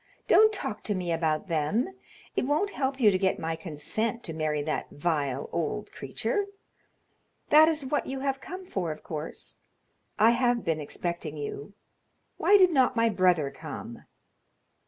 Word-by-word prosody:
Don't 435 0 +7
talk 215 - -3
to 205 - 0
me 180 -2 -2
about 160 +2 0
them; 170 - 0 0.5
it 255 - 0
won't 310 +8 +1
help 270 -4 -2
you 215 -5 +6
to 185 - +1
get 190 -1 +1
my 160 0 -2
consent 170 +9 -3
to 165 - -3
marry 155 -2 -1
that - - -2
vile 145 -4 -1
old 170 +6 -2
creature. 410 -1 -2 1.1
That 310 +1 +8
is 310 -3 0
what 290 +3 -1
you 265 0 -4
have 270 -1 -1
come 370 +2 -7
for, 180 - -2
of 155 - -8
course. 155 0 -6 0.6
I 225 +2 +6
have 240 -1 +2
been 160 -1 0
expecting 160 0 -4
you; 145 +5 -6 0.6
why 410 - +6
did 370 -2 +6
not 260 -4 +3
my 230 0 +3
brother 180 -8 +2
come?" - - -8
200 Hz, 160 wpm, -28 LUFS, 160-265 Hz, 1.1 s, That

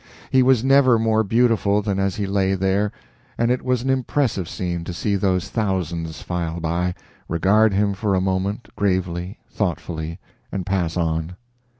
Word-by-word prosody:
He 130 - +5
was 130 -2 +4
never 135 -3 +5
more 110 0 +2
beautiful 105 -2 +2
than 100 -2 -1
as 95 -1 0
he 105 - -2
lay 95 0 +1
there, 95 +2 +1 0.5
and 120 +1 +2
it 125 - 0
was 125 -2 0
an 135 - +1
impressive 130 - 0
scene 85 -2 -3
to 90 - -5
see 100 +3 0
those 95 -2 0
thousands 85 -7 -2
file 85 -1 -3
by, 85 +2 -1 0.3
regard 100 +6 +3
him 100 +1 +1
for 100 0 0
a - - +3
moment, 95 +4 -1
gravely, 90 -1 -1
thoughtfully, 85 -4 -3 0.3
and 95 -2 -3
pass 90 -3 -1
on. 80 0 -1
95 Hz, 165 wpm, -22 LUFS, 90-110 Hz, 0.5 s, He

